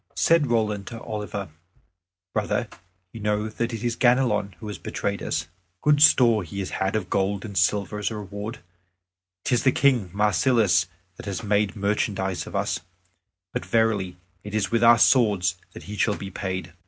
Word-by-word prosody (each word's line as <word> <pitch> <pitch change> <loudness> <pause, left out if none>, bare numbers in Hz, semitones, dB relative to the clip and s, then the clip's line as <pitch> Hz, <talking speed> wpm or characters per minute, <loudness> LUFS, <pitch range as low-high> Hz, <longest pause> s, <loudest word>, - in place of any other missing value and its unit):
Said 165 -3 +3
Roland 105 -4 0
to 115 - -7
Oliver, 105 -4 -5 0.8
"Brother, - - -1 0.5
you 115 - -8
know 105 0 0
that 115 +2 -3
it 115 -1 -5
is 120 -1 0
Ganelon 120 -6 +2
who 90 +5 -12
has 105 -4 -6
betrayed - - -3
us. 80 +2 -2 0.4
Good 145 -1 +4
store 120 -7 +6
he 90 +2 -8
has 95 -2 -3
had 95 +2 -1
of 105 -4 -1
gold 100 +1 0
and 100 -2 -8
silver 100 +4 +1
as 105 - -1
a 110 - -6
reward; 105 +3 -6 0.8
'tis 125 -2 +2
the 130 - +4
King 125 -10 +2
Marsilas 105 -2 +3 0.3
that - - -9
has 100 +3 -4
made 105 -1 +1
merchandise 100 -2 -1
of - - -8
us, - - 0 0.7
but - - -2
verily 100 -2 0 0.3
it 105 +1 -6
is 105 -1 0
with 115 0 +2
our 115 0 +8
swords 100 -8 +3 0.2
that - - -10
he 105 - -7
shall 105 0 +1
be 100 -1 -7
paid." 95 -3 -4
105 Hz, 175 wpm, -24 LUFS, 95-115 Hz, 0.8 s, our